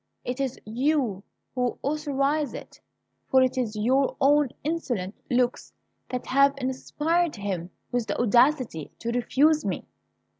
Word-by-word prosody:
It 250 +2 -3
is 265 -3 -2
you 245 -3 0 0.3
who 250 -1 -1
authorize 290 0 0
it! - - -10 0.5
For 260 0 +5
it 255 - +1
is 235 -4 -1
your 260 +6 +2
own 290 0 +4
insolent 250 - -2 0.2
looks 245 0 0 0.4
that 250 -1 -4
have 275 +1 +4
inspired 295 +6 0
him 190 -4 -4 0.2
with 245 -2 -1
the 200 - -2
audacity 240 - +3
to 235 - -3
refuse 290 +6 +3
me!" - - -3
255 Hz, 135 wpm, -26 LUFS, 235-290 Hz, 0.5 s, For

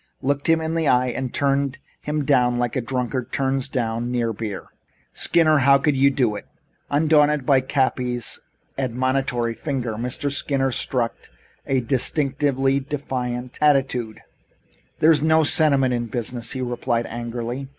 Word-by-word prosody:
looked 140 +3 -1
him 165 0 +4
in 160 0 -3
the 165 -2 0
eye 125 0 +3
and 125 +1 -4
turned 140 -1 0 0.2
him 150 -1 -2
down 125 -3 +2
like 120 -1 -1
a 130 - 0
drunkard 125 0 -3
turns 135 0 0
down 120 -2 -2
near 120 -2 -1
beer. 105 -2 -6 0.5
Skinner, 155 -3 +3
how 140 +1 +5
could 140 +1 +1
you 135 +1 +4
do 125 -6 0
it?" - - -8 0.4
Undaunted 150 -1 +3
by 135 -1 +4
Cappy's 125 -3 -1 0.4
admonitory 130 -1 -1
finger, 125 -1 -3
Mr. 125 +4 -3
Skinner 135 -1 0
struck 120 -1 -1 0.4
a 135 -1 +1
distinctly 135 +1 +1
defiant 125 -3 -5
attitude. 135 -6 +1 0.8
"There 160 - +5
is 150 -3 +3
no 160 +1 +4
sentiment 140 -5 +4
in 120 -1 -2
business," 120 0 -4
he 130 - -4
replied 120 -1 -1
angrily. 120 +3 -5
130 Hz, 145 wpm, -22 LUFS, 120-140 Hz, 0.8 s, how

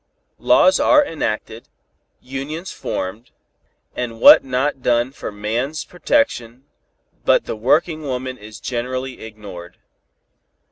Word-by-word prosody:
Laws 280 - +4
are 300 -1 +5
enacted, 115 - -4 0.5
unions 140 +7 -6
formed, 105 +6 -5 0.7
and 115 -2 -4
what - - +9
not 135 +1 -1
done 120 +1 +1
for 135 - -7
man's 115 +9 -3
protection, 155 - -1 0.6
but - - +3
the - - -4
working 155 +8 +1
woman 130 -2 -4
is 105 -2 -12
generally 130 +1 -4
ignored. 100 -5 -10
125 Hz, 105 wpm, -20 LUFS, 110-145 Hz, 0.7 s, what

